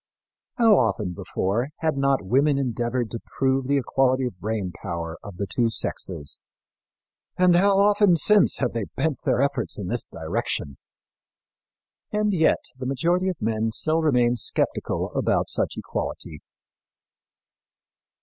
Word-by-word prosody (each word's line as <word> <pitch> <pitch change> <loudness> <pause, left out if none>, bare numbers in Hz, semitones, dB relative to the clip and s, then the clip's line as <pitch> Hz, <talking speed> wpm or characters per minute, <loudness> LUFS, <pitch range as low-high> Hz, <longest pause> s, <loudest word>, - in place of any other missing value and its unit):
" - - -68
How 225 -5 +5
often 105 -5 0
before 105 +9 -2
had 160 -2 +1
not 135 -5 +1
women 135 +7 +2
endeavored 120 -2 -2
to 115 - -4 0.2
prove 135 -1 +1
the 140 +1 +2
equality 130 0 +1
of 100 -8 -6
brain 105 -4 -3
power 85 -1 -5
of 100 -4 -10
the 100 - -2
two 115 +4 0
sexes, 75 -9 -2 1.0
and 180 -1 +5
how 195 +2 +4
often 205 -2 +4
since 205 +6 +5
have - - 0
they 115 -3 -3
bent 155 -6 -1
their 130 - +2
efforts 140 - -1
in - - -5
this - - 0
direction! 70 -2 -3 1.3
And 210 -1 +1
yet 160 -3 +2 0.2
the 130 - -4
majority 170 +8 +1
of 185 - -4
men 110 0 -1
still 155 +8 0
remain 125 -5 +2
skeptical - - -1
about - - 0
such - - 0
equality. 80 -3 -4
130 Hz, 140 wpm, -24 LUFS, 110-160 Hz, 1.3 s, How